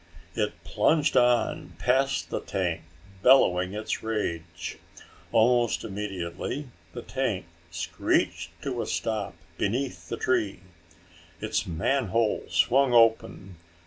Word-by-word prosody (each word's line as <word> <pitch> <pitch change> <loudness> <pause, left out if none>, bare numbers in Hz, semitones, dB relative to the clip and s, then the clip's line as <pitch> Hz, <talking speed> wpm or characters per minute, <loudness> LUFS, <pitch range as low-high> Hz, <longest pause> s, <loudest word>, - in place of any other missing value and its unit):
It 105 +1 -2
plunged 150 +8 +2
on 120 -1 +2
past 130 -7 +1
the - - -1
tank, 90 -4 -2 0.4
bellowing 95 -7 +5
its 105 +1 -3
rage. 85 -6 -4 0.5
Almost 120 +1 +3
immediately 100 - -4 0.3
the 120 - -6
tank 120 -9 -2 0.2
screeched 85 +1 -1
to 125 -4 -2
a - - -4
stop 110 -5 -2 0.2
beneath 125 +6 -2
the - - -3
tree. 100 -8 0 0.8
Its - - -1
manhole 110 +5 0
swung 135 0 +3
open. 110 -5 +3
110 Hz, 105 wpm, -27 LUFS, 90-125 Hz, 0.8 s, bellowing